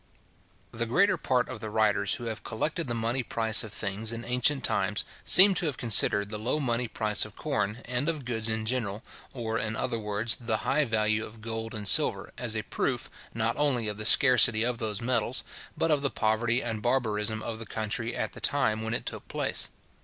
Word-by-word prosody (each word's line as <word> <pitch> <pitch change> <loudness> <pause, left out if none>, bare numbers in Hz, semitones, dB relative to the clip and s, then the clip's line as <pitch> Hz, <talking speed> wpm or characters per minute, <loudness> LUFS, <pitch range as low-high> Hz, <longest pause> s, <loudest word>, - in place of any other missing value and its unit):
The 115 +1 -3
greater 190 - +3
part 125 -1 0
of 115 - -8
the 110 - -6
writers 105 -1 +1
who 125 - -8
have 115 -2 -5
collected 150 +8 -2
the 120 - -3
money 115 +3 -1
price 110 -2 +1
of 110 - -8
things 105 +1 -2
in 115 0 -5
ancient 125 +3 +1
times, - - 0 0.2
seem 195 +2 +9
to 175 -2 0
have 145 - -3
considered 100 -3 +3
the 105 0 -5
low 125 +7 -1
money 120 -3 -1
price 110 -1 0
of 110 -1 -9
corn, 125 -6 -3
and 125 +5 -1
of 155 -5 -4
goods 115 -2 -2
in 110 0 -1
general, 110 -3 -2 0.3
or, 115 -3 -3
in 110 0 -3
other 115 -1 -2
words, 105 +2 +1
the 115 -2 -1
high 150 - +2
value 110 -2 0
of 110 +1 -11
gold 115 +1 -5
and 105 -1 -3
silver, - - +4
as - - -1
a - - -3
proof, - - -3 0.2
not 115 0 0
only 135 -6 +1
of 105 -1 -3
the 110 - -6
scarcity 120 -3 +6
of 120 -1 -2
those 110 -1 -3
metals, 125 +1 0 0.3
but 165 - 0
of 150 -2 +2
the 140 - 0
poverty 120 +3 0
and 115 -3 -4
barbarism 110 -3 -1
of 110 -1 -5
the 115 - -8
country 110 +3 -3
at - - -3
the - - -10
time 110 -6 0
when 110 +1 -3
it - - -4
took - - -6
place. - - -2
115 Hz, 210 wpm, -27 LUFS, 110-125 Hz, 0.3 s, seem